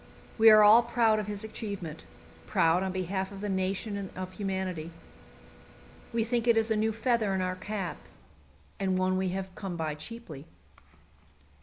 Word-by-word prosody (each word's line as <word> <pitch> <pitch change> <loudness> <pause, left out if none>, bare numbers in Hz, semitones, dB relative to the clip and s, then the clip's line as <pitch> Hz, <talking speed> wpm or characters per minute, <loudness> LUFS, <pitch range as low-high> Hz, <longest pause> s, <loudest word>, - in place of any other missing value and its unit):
We 225 0 +9
are 215 -1 +8
all 215 +3 +8
proud 230 -2 +2
of 210 - -4
his 205 0 -4
achievement 200 -7 -6 0.4
proud 165 +2 +3
on 190 0 -1
behalf 190 +1 -3
of 200 - -9
the 205 +1 -3
nation 190 +2 -2
and 200 -2 -5
of 185 0 -5
humanity. 190 -4 -3 1.2
We 230 -1 +1
think 235 +1 -1
it 235 -1 +5
is 225 0 +2
a - - +3
new 220 +1 +1
feather 220 -2 0
in 190 - 0
our 185 0 -2
cap, 190 -1 -4 0.8
and 190 -1 0
one 185 0 +1
we 190 0 0
have 190 0 -4
come 190 -2 -5
by 160 -2 -2
cheaply. 155 -2 -9
195 Hz, 170 wpm, -29 LUFS, 185-220 Hz, 1.2 s, We